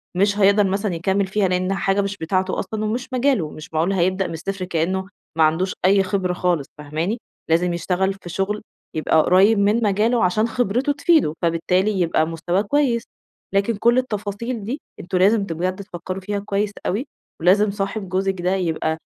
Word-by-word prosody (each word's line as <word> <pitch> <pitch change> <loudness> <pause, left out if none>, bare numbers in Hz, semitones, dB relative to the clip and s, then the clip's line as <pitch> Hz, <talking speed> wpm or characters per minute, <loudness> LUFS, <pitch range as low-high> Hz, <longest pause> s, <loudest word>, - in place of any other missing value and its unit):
مش 200 +2 +2
هيقدر 200 +1 +5
مثلًا 195 -1 -1
يكمّل 190 +3 0
فيها، 195 0 +1
لإن 185 +1 0
حاجة 195 +1 +1
مش 200 0 -3
بتاعته 185 +2 -1
أصلًا 215 -1 -3
ومش 240 +4 -2
مجاله، 255 - +1
مش 155 +1 -11
معقول 165 +5 +1
هيبدأ 185 +1 +1
من - - -6
الصفر 185 +3 -4
كإنّه 180 +2 -1 0.3
ما 160 - +5
عندوش 165 +4 +2
أي 195 +1 +5
خبرة 185 -1 -1
خالص 175 -5 0
فاهماني؟ 155 +9 -3 0.3
لازم 170 +2 +2
يشتغل 185 +3 0
في 190 -2 -11
شُغل 195 +4 -2 0.3
يبقى 160 0 +3
قريّب 200 +4 +5
من 210 +3 +2
مجاله 215 +4 +2
عشان 215 +5 +2
خبرته 245 +4 0
تفيده، 290 - +3
فبالتالي 180 +4 +1
يبقى 165 -2 +2
مستواه 175 +3 -1
كويس، 235 +1 +1 0.5
لكن 200 +4 +2
كل 235 +4 +3
التفاصيل 220 -1 -3
دي 250 +8 -4 0.2
أنتم 180 - -2
لازم 200 +3 +4
بجد 185 0 -2
تفكّروا 185 -1 -6
فيها 205 +1 -3
كويس 205 0 -1 0.2
أوي 220 +9 -1 0.3
ولازم 200 +4 +4
صاحب 195 0 -3
جوزِك 190 0 -1
ده 180 +2 +1
يبقى 160 -3 -1
195 Hz, 175 wpm, -21 LUFS, 180-210 Hz, 0.5 s, هيقدر